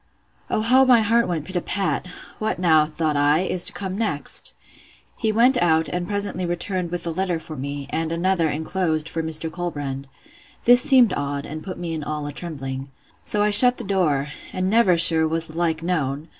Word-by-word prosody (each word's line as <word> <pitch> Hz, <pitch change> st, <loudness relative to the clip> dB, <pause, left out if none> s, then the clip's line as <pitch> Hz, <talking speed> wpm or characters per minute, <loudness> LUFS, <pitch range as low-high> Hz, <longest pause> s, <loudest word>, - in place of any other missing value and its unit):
O -, -, 0 dB
how 255 Hz, +4 st, +4 dB
my 250 Hz, -3 st, +5 dB
heart 230 Hz, +2 st, +2 dB
went 165 Hz, -4 st, -3 dB
pit 185 Hz, -, -10 dB
a 175 Hz, -, 0 dB
pat! 195 Hz, -1 st, -2 dB, 0.3 s
What 215 Hz, -, -2 dB
now, 160 Hz, -4 st, +3 dB
thought 155 Hz, -1 st, -2 dB
I, 145 Hz, +3 st, +2 dB
is 185 Hz, -1 st, +1 dB
to -, -, +3 dB
come 190 Hz, -2 st, -5 dB
next! 155 Hz, -11 st, -1 dB, 0.6 s
He 220 Hz, -2 st, -1 dB
went 245 Hz, +4 st, +3 dB
out, 160 Hz, -2 st, +2 dB
and 175 Hz, +3 st, -4 dB
presently 200 Hz, -2 st, -3 dB
returned 175 Hz, +1 st, -3 dB
with 175 Hz, 0 st, -5 dB
a 170 Hz, -, -2 dB
letter 180 Hz, 0 st, -2 dB
for 160 Hz, -1 st, -9 dB
me, 140 Hz, +1 st, -6 dB
and 165 Hz, 0 st, -2 dB
another, 170 Hz, -1 st, 0 dB
enclosed, 160 Hz, +1 st, -2 dB
for 165 Hz, -, -4 dB
Mr. 160 Hz, 0 st, -1 dB
Colbrand. 145 Hz, -6 st, -5 dB, 0.6 s
This 245 Hz, +1 st, +6 dB
seemed 255 Hz, -6 st, +4 dB
odd, 140 Hz, 0 st, -4 dB
and 155 Hz, +1 st, -8 dB
put 185 Hz, -, -7 dB
me 165 Hz, -3 st, -5 dB
all 150 Hz, 0 st, -4 dB
in 145 Hz, -, -5 dB
a -, -, -16 dB
trembling. 135 Hz, -5 st, -6 dB, 0.3 s
So 205 Hz, 0 st, 0 dB
I 210 Hz, -, +2 dB
shut 245 Hz, +4 st, +9 dB
the -, -, -7 dB
door; 155 Hz, -8 st, 0 dB, 0.2 s
and 185 Hz, +1 st, -2 dB
never, 210 Hz, -6 st, +3 dB
sure, 165 Hz, -1 st, +5 dB
was 165 Hz, +1 st, -1 dB
the 155 Hz, -, -12 dB
like 165 Hz, -2 st, -1 dB
known! 155 Hz, -3 st, -2 dB
170 Hz, 200 wpm, -22 LUFS, 155-190 Hz, 0.6 s, shut